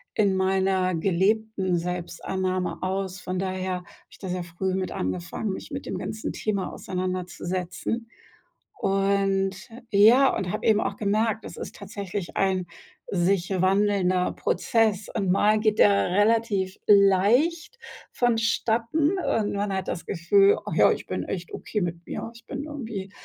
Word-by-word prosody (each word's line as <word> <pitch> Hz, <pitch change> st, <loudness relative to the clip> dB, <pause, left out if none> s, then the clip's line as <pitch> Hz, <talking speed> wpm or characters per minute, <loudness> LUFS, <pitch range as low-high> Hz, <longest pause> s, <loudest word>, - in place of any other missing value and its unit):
in 200 Hz, -3 st, +3 dB
meiner 190 Hz, -1 st, +1 dB
gelebten 190 Hz, +1 st, +1 dB
Selbstannahme 180 Hz, +1 st, -3 dB
aus?“ 190 Hz, 0 st, -3 dB
Von 185 Hz, 0 st, -4 dB
daher 185 Hz, 0 st, -2 dB
habe 180 Hz, -1 st, -7 dB, 0.2 s
ich -, -, -16 dB
da 190 Hz, -, -7 dB
sehr 180 Hz, -1 st, -2 dB
früh 180 Hz, +2 st, -3 dB
mit 190 Hz, -1 st, -2 dB
angefangen, 95 Hz, -, -3 dB
mich -, -, -8 dB
mit 275 Hz, -1 st, -6 dB
dem -, -, -4 dB
ganzen 220 Hz, -, -4 dB
Thema 200 Hz, -3 st, -2 dB
auseinanderzusetzen. 185 Hz, +4 st, -4 dB, 0.7 s
Und 195 Hz, 0 st, +1 dB, 0.3 s
ja, 230 Hz, +7 st, +6 dB
und 180 Hz, -2 st, -2 dB
habe 215 Hz, -, -3 dB
eben 215 Hz, -1 st, +4 dB
auch 200 Hz, -, -2 dB
gemerkt, 215 Hz, +1 st, 0 dB
das -, -, -8 dB
ist -, -, -7 dB
tatsächlich 200 Hz, -2 st, -6 dB
ein 190 Hz, -2 st, +1 dB, 0.4 s
sich 180 Hz, 0 st, +1 dB
wandelnder 190 Hz, -2 st, +2 dB
Prozess, 215 Hz, -3 st, +1 dB
und 195 Hz, -5 st, 0 dB
mal 210 Hz, +3 st, +3 dB
geht 215 Hz, -1 st, +1 dB
der 200 Hz, -3 st, +4 dB
relativ 205 Hz, -1 st, +2 dB
leicht 210 Hz, -, +4 dB, 0.3 s
vonstatten 235 Hz, -, +1 dB
und 215 Hz, -, 0 dB
man 200 Hz, 0 st, -1 dB
hat 190 Hz, -1 st, -3 dB
das 170 Hz, -, -3 dB
Gefühl: 395 Hz, -, +4 dB
„Ach -, -, -3 dB
ja, -, -, +5 dB
ich -, -, -5 dB
bin -, -, -3 dB
echt 175 Hz, -3 st, -5 dB
okay 210 Hz, -, -3 dB
mit 170 Hz, -1 st, -3 dB
mir, 230 Hz, -, -5 dB
ich 230 Hz, -, -16 dB
bin 275 Hz, +2 st, -5 dB
irgendwie 225 Hz, -10 st, -6 dB
195 Hz, 145 wpm, -25 LUFS, 185-220 Hz, 0.7 s, ja